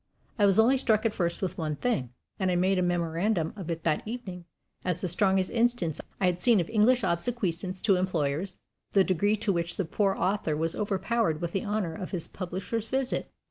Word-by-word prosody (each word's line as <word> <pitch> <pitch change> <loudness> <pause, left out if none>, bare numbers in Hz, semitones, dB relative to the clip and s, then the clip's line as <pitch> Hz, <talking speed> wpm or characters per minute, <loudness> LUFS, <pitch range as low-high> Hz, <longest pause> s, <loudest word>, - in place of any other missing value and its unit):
I 205 - +6
was 195 - +3
only 240 +5 +5
struck 220 -4 +2
at 225 - +2
first 170 -1 -2
with 185 -1 -3
one 155 -2 -1
thing 145 - -1 0.3
and 190 -2 +1
I 180 - +1
made 185 +1 +2
a - - +2
memorandum 175 +1 0
of 190 -5 -7
it 165 -1 -3
that 155 -2 +1
evening 195 -7 -6 0.4
as 180 -2 0
the 185 - 0
strongest 190 +1 +2
instance 235 -9 +1 0.2
I 195 - +2
had 180 0 +1
seen 230 +1 +5
of 170 - -1
English 230 +3 +4
obsequiousness 185 -1 -1
to 200 -5 +4
employers 180 0 -1 0.4
the 195 - +6
degree 195 +4 +2
to 210 -1 0
which 170 0 -2
the 195 - 0
poor 195 +4 +1
author 185 -6 0
was 165 +1 +1
overpowered 200 -3 0
with 170 0 -3
the 195 - -2
honor 205 -5 -1
of 180 +2 -6
his 180 -5 -3
publisher's 190 +5 -4
visit! 260 +2 -1
185 Hz, 205 wpm, -28 LUFS, 170-215 Hz, 0.4 s, I